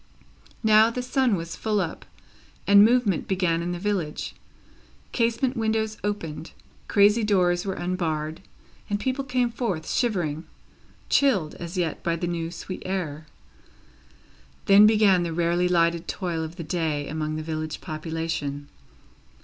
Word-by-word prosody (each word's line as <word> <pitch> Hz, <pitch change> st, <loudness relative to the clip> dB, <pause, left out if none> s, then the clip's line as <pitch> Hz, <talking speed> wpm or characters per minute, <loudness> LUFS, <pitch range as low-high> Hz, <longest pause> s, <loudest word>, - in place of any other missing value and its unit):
Now, 220 Hz, +1 st, +6 dB
the 250 Hz, +2 st, -4 dB
sun 255 Hz, -3 st, +2 dB
was 165 Hz, -1 st, -5 dB
full 215 Hz, -2 st, 0 dB
up, 170 Hz, -4 st, -4 dB, 0.6 s
and 200 Hz, 0 st, +7 dB
movement 225 Hz, -5 st, +2 dB
began 180 Hz, -3 st, +1 dB
in 175 Hz, +1 st, -3 dB
the 175 Hz, -, -3 dB
village. 180 Hz, -5 st, -2 dB, 0.8 s
Casement 235 Hz, +2 st, 0 dB
windows 220 Hz, -1 st, -1 dB
opened, 165 Hz, -6 st, -4 dB, 0.3 s
crazy 205 Hz, +3 st, +4 dB
doors 180 Hz, -3 st, +2 dB
were 190 Hz, -, -2 dB
unbarred, 160 Hz, -3 st, -2 dB, 0.5 s
and 205 Hz, 0 st, -1 dB
people 260 Hz, +4 st, -1 dB
came 250 Hz, -2 st, 0 dB
forth 205 Hz, -9 st, -3 dB
shivering 175 Hz, -, -1 dB, 0.6 s
chilled, 200 Hz, -, +2 dB
as 170 Hz, +2 st, -7 dB
yet, 170 Hz, -4 st, -1 dB
by 170 Hz, -, 0 dB
the 170 Hz, -, -3 dB
new 170 Hz, -1 st, -2 dB
sweet 185 Hz, +2 st, -7 dB
air. 160 Hz, -5 st, -4 dB, 1.4 s
Then 200 Hz, +1 st, +8 dB
began 210 Hz, -4 st, +4 dB
the 170 Hz, -1 st, -2 dB
rarely 175 Hz, +1 st, +1 dB
lightened 170 Hz, -1 st, +1 dB
toil 170 Hz, -4 st, -3 dB
of 160 Hz, +1 st, -7 dB
the 170 Hz, -, -6 dB
day 155 Hz, -4 st, -2 dB
among 155 Hz, 0 st, -3 dB
the 155 Hz, -, -4 dB
village 155 Hz, -1 st, -4 dB
population. 155 Hz, -3 st, -4 dB
180 Hz, 140 wpm, -25 LUFS, 165-210 Hz, 1.4 s, Then